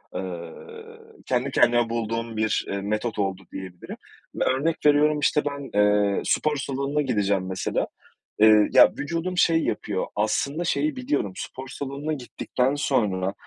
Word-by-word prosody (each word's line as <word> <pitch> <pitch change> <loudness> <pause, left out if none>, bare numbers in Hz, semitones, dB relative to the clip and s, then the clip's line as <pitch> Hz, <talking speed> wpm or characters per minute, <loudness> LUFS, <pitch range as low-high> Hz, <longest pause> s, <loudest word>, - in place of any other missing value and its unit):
Iıı, 445 - -9
kendi 130 +2 0
kendime 120 -2 +3
bulduğum 115 0 -3
bir, 110 0 0
iii, 100 0 -2
metot 105 +2 -2
oldu 95 -1 -1
diyebilirim. 95 -2 -8 0.4
Ve - - 0
örnek 150 +5 0
veriyorum 150 +1 +4
işte 150 0 +2
ben, 140 -7 -3
ııı, 105 -1 +3
spor 150 -1 +1
salonuna 140 +2 -2
gideceğim 100 -7 0
mesela, 95 0 -2 0.5
ııı, 110 -1 +7
ya, - - +8
vücudum 170 +4 -3
şey 165 -2 +3
yapıyor, 105 -2 -2
aslında 140 +10 0
şeyi 300 - 0
biliyorum, 255 - -2
spor 130 +1 -7
salonuna 140 +3 -4
gittikten 130 0 -2
sonra, 100 -10 0
125 Hz, 140 wpm, -24 LUFS, 105-150 Hz, 0.5 s, ya